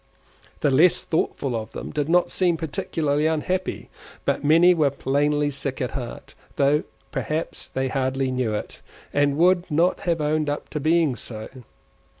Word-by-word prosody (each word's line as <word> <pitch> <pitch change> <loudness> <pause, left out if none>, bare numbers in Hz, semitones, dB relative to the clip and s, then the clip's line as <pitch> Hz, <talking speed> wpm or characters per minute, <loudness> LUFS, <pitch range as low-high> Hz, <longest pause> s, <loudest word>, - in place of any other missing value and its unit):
The 145 - +3
less 160 +7 +5
thoughtful 140 -5 -1
of 110 -1 -5
them - - -6
did 150 0 -2
not 175 +1 +3
seem 175 -3 +1
particularly 155 -1 -1
unhappy, 180 +4 -2 0.3
but - - 0
many 165 +5 +6
were 155 -4 +3
plainly 145 +2 0
sick 140 -1 -3
at 125 - -2
heart, 125 -3 -7 0.2
though 145 +2 +2 0.3
perhaps 155 +2 -3
they 130 0 -2
hardly 130 0 -1
knew 125 -4 -1
it, - - -6 0.3
and 145 0 +2
would 180 +2 +3
not 170 +4 +2
have 165 -1 +1
owned 150 0 0 0.2
to 150 - -2
being 155 -2 +2
so. 110 -3 -7
150 Hz, 150 wpm, -24 LUFS, 135-165 Hz, 0.3 s, many